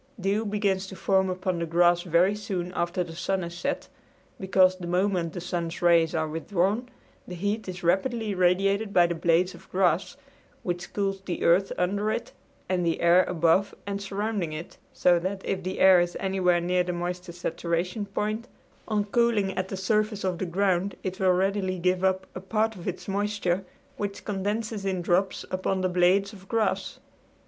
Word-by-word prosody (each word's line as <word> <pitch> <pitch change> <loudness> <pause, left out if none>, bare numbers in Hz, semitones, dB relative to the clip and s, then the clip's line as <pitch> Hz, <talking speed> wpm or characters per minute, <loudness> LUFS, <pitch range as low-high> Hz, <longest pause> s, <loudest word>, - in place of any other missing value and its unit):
Dew 200 +3 0
begins 200 -2 0
to 190 - -9
form 190 0 +2
upon 185 -1 -2
the 170 - -2
grass 175 +1 +4
very 175 +3 +3
soon 190 -4 -4
after 175 +1 -1
the 165 -1 -9
sun 185 +2 -1
is 170 0 -6
set 175 - -3 0.5
because 190 -1 +4
the 175 -2 -7
moment 180 -2 0
the - - -4
sun's 170 -1 -3
rays 170 -2 +4
are 160 -1 0
withdrawn 195 +9 -1 0.4
the 180 - -6
heat 205 +3 -2
is 180 -1 -7
rapidly 215 +5 +1
radiated 195 +3 +2
by 175 - +6
the 175 - 0
blades 170 +2 +2
of - - -15
grass, 185 - +1 0.5
which 175 0 -4
cools 195 -1 -1
the 185 -2 -4
earth 180 +3 +4
under 200 +4 0
it 230 - -3 0.4
and 180 -1 0
the 165 -1 0
air 170 +2 +5
above 170 +3 +2
and 200 0 -3
surrounding 200 -4 -2
it, 155 +2 -7 0.2
so 175 -1 +3
that 190 +2 -4
if 190 -1 -1
the 185 +1 -4
air 190 -1 +7
is 175 0 -2
anywhere 185 -2 +2
near 180 +1 +1
the 180 - -3
moisture 175 +1 -4
saturation 175 +3 -2
point 215 +4 -2 0.4
on 210 -2 +1
cooling 215 -2 +2
at 185 0 -2
the 190 - -5
surface 210 +2 0
of 185 -2 -1
the 190 - -2
ground 190 +1 +1
it 190 +1 -4
will 190 -1 +3
readily 190 0 0
give 180 +1 +1
up 190 0 +1
a - - -5
part 220 +3 0
of 175 - -9
its 185 - -4
moisture, 200 -2 -1 0.3
which 200 -1 -4
condenses 210 +1 -2
in 190 -2 -1
drops 185 +2 +1
upon 185 0 -1
the 185 - +2
blades 185 +3 +2
of 190 -2 -14
grass. 225 0 -1
185 Hz, 185 wpm, -27 LUFS, 175-200 Hz, 0.5 s, air